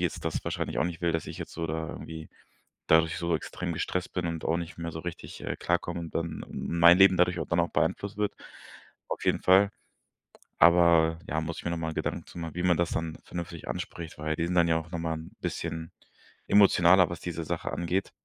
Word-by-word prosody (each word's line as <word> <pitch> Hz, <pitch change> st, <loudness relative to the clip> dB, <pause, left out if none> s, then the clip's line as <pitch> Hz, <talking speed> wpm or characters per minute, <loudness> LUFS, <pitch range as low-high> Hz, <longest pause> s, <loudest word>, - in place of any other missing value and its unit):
jetzt -, -, -2 dB
das -, -, -2 dB
wahrscheinlich -, -, -3 dB
auch -, -, +2 dB
nicht 85 Hz, -2 st, -4 dB
will, 85 Hz, -1 st, +1 dB
dass 80 Hz, -, -2 dB
ich -, -, -7 dB
jetzt -, -, -7 dB
so 85 Hz, 0 st, -3 dB
da 80 Hz, 0 st, -3 dB
irgendwie 80 Hz, -1 st, -8 dB, 0.6 s
dadurch 80 Hz, 0 st, +4 dB
so 85 Hz, -1 st, +1 dB
extrem 85 Hz, +2 st, -5 dB
gestresst 90 Hz, +3 st, -3 dB
bin 90 Hz, -2 st, -2 dB
und 85 Hz, -1 st, -4 dB
auch 80 Hz, -, +1 dB
nicht 85 Hz, -1 st, -5 dB
mehr 85 Hz, 0 st, -4 dB
so 80 Hz, -, -6 dB
richtig, 85 Hz, 0 st, -7 dB
äh, -, -, -3 dB
klarkomme 85 Hz, -, -1 dB
und 85 Hz, -1 st, -8 dB
dann 85 Hz, -1 st, -3 dB
mein 85 Hz, +1 st, +5 dB
Leben 95 Hz, -1 st, +7 dB
dadurch 90 Hz, 0 st, +3 dB
dann -, -, +2 dB
auch -, -, 0 dB
beeinflusst 100 Hz, +1 st, -1 dB
wird. 105 Hz, -1 st, 0 dB, 0.7 s
Auf -, -, -4 dB
jeden -, -, +2 dB
Fall. 95 Hz, +2 st, +5 dB, 0.9 s
Aber 85 Hz, -1 st, +5 dB
ja, 80 Hz, +2 st, 0 dB
muss 80 Hz, +1 st, -5 dB
ich -, -, -8 dB
mir 85 Hz, -, -1 dB
nochmal 80 Hz, -1 st, -3 dB
Gedanken -, -, -3 dB
zu -, -, -11 dB
machen, 80 Hz, -2 st, -5 dB
wie 90 Hz, -, -1 dB
man 90 Hz, -2 st, +4 dB
das 85 Hz, 0 st, 0 dB
dann 80 Hz, -1 st, -3 dB
vernünftig 85 Hz, -1 st, -7 dB
anspricht, 85 Hz, -2 st, -6 dB
weil 75 Hz, 0 st, -2 dB
wir 85 Hz, -, 0 dB
sind 90 Hz, -, -2 dB
dann 85 Hz, -1 st, +5 dB
ja 80 Hz, -1 st, +3 dB
auch 85 Hz, +1 st, -11 dB
nochmal 85 Hz, -2 st, -2 dB
ein 80 Hz, +1 st, -10 dB
bisschen 80 Hz, 0 st, -4 dB, 0.6 s
emotionaler, 95 Hz, -3 st, +6 dB
was 85 Hz, -, -6 dB
diese 85 Hz, -2 st, -4 dB
Sache -, -, -3 dB
angeht. 90 Hz, +3 st, -1 dB
85 Hz, 215 wpm, -28 LUFS, 80-90 Hz, 0.9 s, Leben